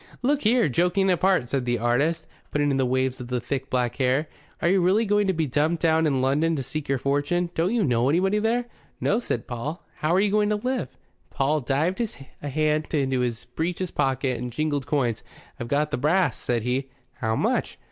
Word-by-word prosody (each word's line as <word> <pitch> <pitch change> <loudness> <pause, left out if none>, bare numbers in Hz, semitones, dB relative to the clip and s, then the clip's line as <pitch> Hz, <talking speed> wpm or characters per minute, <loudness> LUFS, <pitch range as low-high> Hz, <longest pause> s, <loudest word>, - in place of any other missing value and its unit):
"Look 285 +3 +2
here, 230 -2 +3
joking 180 +7 +2
apart," 180 -6 +2
said 130 0 -1
the 120 0 +1
artist, 125 +8 +1 0.2
putting 145 -1 +1
in 135 - +1
the 130 -1 +2
waves 130 0 0
of 125 - -7
the 125 0 -1
thick 135 +3 -4
black 125 -2 0
hair, 135 +3 +1 0.3
"are - - +1
you 190 +1 +4
really 195 +6 +3
going 205 0 +2
to - - +3
be 160 -2 0
dumped 155 +5 0
down 160 -1 +3
in 135 -3 +1
London 150 +5 +2
to 135 - -2
seek 155 +3 -5
your 135 - +2
fortune? 145 +6 0
Don't 180 +8 0
you 230 - +2
know 125 -4 +2
anybody 190 +7 +2
there?" 235 +3 +1 0.3
"No," 215 - +1
said 120 - -3
Paul. 135 +8 -5
"How 155 - 0
are - - +4
you 205 0 +2
going 210 0 +2
to 210 - +2
live?" 250 - -2 0.4
Paul 145 +3 +1
dived 150 - 0 0.4
a 145 - -4
hand 155 +2 0
into 135 -3 +1
his 120 -2 -2
breeches 170 +7 -3
pocket 135 -2 0
and 125 0 -4
jingled 145 0 -1
coins. 130 -6 0 0.4
"I've 120 - -4
got 150 +4 0
th' 145 - -2
brass," 155 -2 +2
said 120 -2 -2
he. 130 +2 -1 0.3
"How 110 -3 -1
much?" - - 0
150 Hz, 210 wpm, -25 LUFS, 130-180 Hz, 0.4 s, you